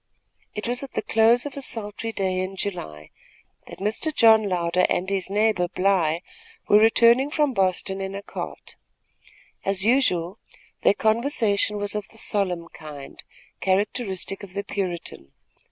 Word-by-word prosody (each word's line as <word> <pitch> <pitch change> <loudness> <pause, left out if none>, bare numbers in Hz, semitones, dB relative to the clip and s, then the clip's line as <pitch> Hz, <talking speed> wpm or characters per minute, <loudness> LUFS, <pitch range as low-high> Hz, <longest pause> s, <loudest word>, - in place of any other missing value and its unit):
It 210 +2 -4
was 245 +1 -2
at 275 - -9
the - - -2
close 230 +3 +3
of 290 - -6
a 280 - -5
sultry 225 -2 -3
day 190 -3 -1
in 185 +1 -3
July 75 - -6 0.6
that - - -10
Mr. 215 +10 -1
John 220 -6 +5
Louder 180 0 +1
and 185 - 0
his 195 -1 -1
neighbor 210 -3 +2
Bly 175 -3 +1 0.4
were 205 - +6
returning 235 +4 +5
from 295 -2 +1
Boston 190 -1 0
in 195 0 -4
a 200 - -6
cart. - - -7 0.9
As 195 0 +1
usual, 205 -7 +2 0.4
their - - +4
conversation 220 -3 +1
was 205 0 -2
of 210 -2 -4
the 225 - -15
solemn 185 -6 -1
kind, 145 -3 -10 0.4
characteristic 195 0 -1
of 195 -2 -11
the 200 - -2
Puritan. 175 - -5
200 Hz, 150 wpm, -24 LUFS, 185-225 Hz, 0.9 s, were